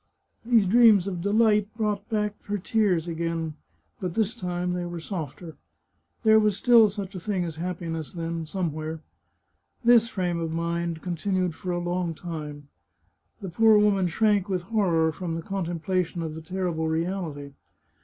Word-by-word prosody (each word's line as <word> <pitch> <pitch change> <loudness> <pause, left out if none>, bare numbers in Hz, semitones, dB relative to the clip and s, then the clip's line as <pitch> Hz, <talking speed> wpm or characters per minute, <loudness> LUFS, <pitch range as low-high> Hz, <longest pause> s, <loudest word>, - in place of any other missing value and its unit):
These 230 -3 +4
dreams 215 -2 +6
of 180 -3 -3
delight 210 +1 +3
brought 210 -1 -2
back 210 -2 -1
her 205 0 -2
tears 190 -4 +1
again, 165 -1 -2 0.5
but 180 -3 -4
this 220 +1 0
time, 180 -3 -2
they 180 0 -2
were 175 -1 -5
softer. 165 -2 -6 0.7
There 220 -1 +6
was 210 -2 +2
still 230 -1 +6
such 200 -1 -6
a 185 - -5
thing 185 -1 -1
as 160 -2 -6
happiness, 165 -2 -4
then, 165 -2 -4
somewhere. 160 -3 -3 0.8
This 235 -1 +5
frame 180 -4 -1
of 165 -1 -3
mind 170 0 -2
con 175 -2 -3
tinued 185 0 0
for 180 - -7
a 175 - -1
long 175 -1 -2
time. 150 -4 -7 0.7
The 190 - -5
poor 220 +5 +5
woman 200 -3 +3
shrank 205 +2 +2
with 185 -2 -1
horror 175 -6 +2
from 170 0 -4
the 165 - -5
contemplation 175 -1 -2
of 160 -1 -4
the 160 - -7
terrible 170 -1 -2
reality. 160 -3 -3
180 Hz, 160 wpm, -26 LUFS, 165-205 Hz, 0.8 s, dreams